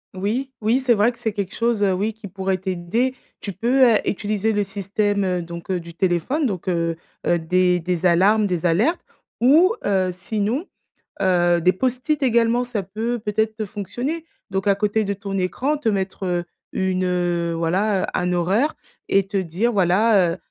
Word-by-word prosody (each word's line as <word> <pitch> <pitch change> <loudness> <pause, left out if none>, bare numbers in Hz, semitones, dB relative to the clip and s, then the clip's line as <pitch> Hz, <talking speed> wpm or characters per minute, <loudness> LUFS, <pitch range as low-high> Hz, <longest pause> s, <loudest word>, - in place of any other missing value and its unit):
Oui, 225 +8 -2
oui 225 +4 +2
c'est 255 -3 +3
vrai 215 +3 +3
que 240 - -19
c'est 220 - -2
quelque 200 -2 -4
chose, 230 -2 0
heu, 195 -2 +3
oui, 205 +4 -1
qui 220 -1 -10
pourrait 190 0 -2
t'aider. 190 +7 -1 0.3
Tu 200 - -5
peux, 250 +7 +3
heu, - - +5
utiliser 215 +2 -1
le 205 0 +1
système, 200 +1 -1
heu, 180 -2 0
donc 170 +1 -9
heu, 185 -1 0
du 170 0 -11
téléphone, 190 - 0
donc 190 -4 -5
heu 170 -2 0 0.3
heu, 175 - +3
des 180 +2 +2
des 180 +1 -2
alarmes, 200 +5 +4
des 180 -3 -2
alertes 210 - +2 0.4
ou 320 - +5
heu, 190 -2 +2
sinon, 215 - -2 0.6
heu, 175 -2 +3
des 180 +2 +4
post-it 260 +7 -1
également, 235 -1 +3
ça 240 -5 -3
peut 220 +6 -3
peut-être, 220 0 -1
heu, - - -1
fonctionner, 240 - -4 0.3
donc 190 +1 -1
à 200 - +4
côté 210 +1 0
de 200 - -1
ton 200 0 -6
écran 260 +11 -1
te 250 -6 0
mettre, 195 -1 -2
heu, 175 -1 0 0.3
une, 185 0 0
heu, 175 -2 0
voilà, 185 +4 +1
heu, - - +1
un 180 0 0
horaire 195 - +1 0.3
et 195 -1 +3
te 200 - -2
dire 190 +6 0
voilà, 190 -1 +3
heu - - -7
200 Hz, 185 wpm, -22 LUFS, 180-225 Hz, 0.6 s, heu